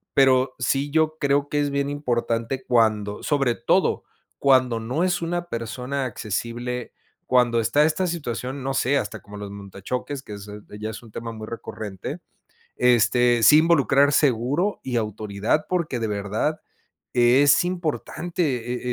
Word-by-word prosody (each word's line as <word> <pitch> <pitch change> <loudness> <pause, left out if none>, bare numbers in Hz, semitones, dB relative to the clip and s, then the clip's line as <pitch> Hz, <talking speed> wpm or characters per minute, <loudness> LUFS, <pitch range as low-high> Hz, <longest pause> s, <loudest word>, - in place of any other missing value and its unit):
Pero, 130 -1 +4
sí 135 +3 0
yo 155 0 +1
creo 140 0 +1
que 145 - 0
es 145 -1 0
bien 140 0 -1
importante 125 -2 -2
cuando 110 -4 +1
sobre 140 -5 +1
todo, - - +1 0.4
cuando 130 -4 +3
no 125 +9 -2
es 180 -1 0
una 175 +1 -3
persona 125 +4 -3
accesible, 120 +2 -4 0.3
cuando 125 -2 +3
está 115 +6 +3
esta 160 +4 0
situación, 135 -5 -4
no 135 +1 -2
sé, 135 +1 +2
hasta 105 -6 -3
como 105 - -12
los 100 -1 -7
monta-choques, 100 +8 -6
que 105 - -9
es 100 0 -10 0.3
ya 110 +1 -4
es 110 - -9
un 115 - -15
tema 115 +1 -6
muy 110 -1 -8
recurrente, 105 -4 -6 0.6
este, 120 0 +3
sí 150 +7 +8
involucrar 145 -3 +4
seguro 145 - +1
y 125 -2 -3
autoridad, 105 +4 -1
porque 170 -8 -1
de 110 - -1
verdad 105 +9 -2 0.5
es 135 +5 +5
importante, 155 -7 -2
125 Hz, 145 wpm, -23 LUFS, 115-145 Hz, 0.6 s, sí